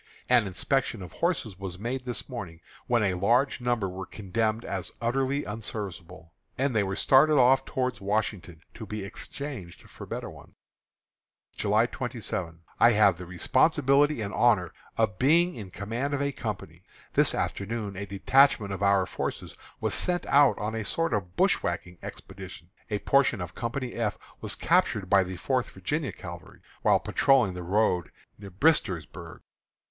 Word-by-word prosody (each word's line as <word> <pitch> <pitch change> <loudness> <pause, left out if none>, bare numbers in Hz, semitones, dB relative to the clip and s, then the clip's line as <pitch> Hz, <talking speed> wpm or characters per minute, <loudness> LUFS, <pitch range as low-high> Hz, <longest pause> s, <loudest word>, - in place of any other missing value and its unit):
An 120 -4 +4
inspection 115 +2 -1
of 90 - -10
horses 135 - -1
was 95 -2 -6
made 125 +5 -4
this 125 -1 -3
morning, 95 -11 -7 0.3
when 120 -2 +2
a 95 -2 +2
large 120 +9 +2
number 120 -5 0
were 95 0 -6
condemned 110 +3 -2
as 95 -2 -3
utterly 135 +4 0
unserviceable; 95 -5 -6 0.2
and 135 -2 0
they 105 - +4
were 95 -1 -2
started 150 +7 +5
off 130 +1 +5
toward 130 -1 -2
Washington, 100 -5 -2
to - - -9
be 105 -2 -5
exchanged 105 -2 -7
for - - -11
better - - -5
ones. - - -13 1.0
July 105 +2 +3
27. 110 -10 -4 0.2
I 120 - +6
have 100 -5 +4
the 90 - -8
responsibility 140 - +3
and 100 -1 -4
honor - - +3 0.2
of 105 -5 +1
being 170 +7 +4
in 105 -5 -8
command 115 +10 -3
of 145 - -2
a 140 - 0
company. 100 - -6 0.3
This - - +3
afternoon 105 0 -3
a 100 +2 -5
detachment 105 +1 +3
of 95 - -6
our 100 -1 +3
forces - - -4 0.3
was - - -1
sent 180 -1 0
out 140 -1 +5
on 105 +1 -3
a 110 -1 -2
sort 165 +6 0
of 95 -4 -2
bushwhacking 90 -1 0
expedition. 95 -2 -10 0.2
A 105 - 0
portion 135 0 +2
of 90 -1 -6
Company 120 +1 -4
F 115 -3 -2 0.2
was - - -4
captured 95 -3 +1
by 100 -1 +6
the 90 0 -6
Fourth 130 +5 -1
Virginia 140 - -3
Cavalry, 85 -1 -10 0.2
while - - +4
patrolling 130 -9 +3
the 90 - -6
road 90 -1 +1 0.3
near 100 -1 -9
Bristersburg. 95 - 0
105 Hz, 160 wpm, -27 LUFS, 95-130 Hz, 1.0 s, I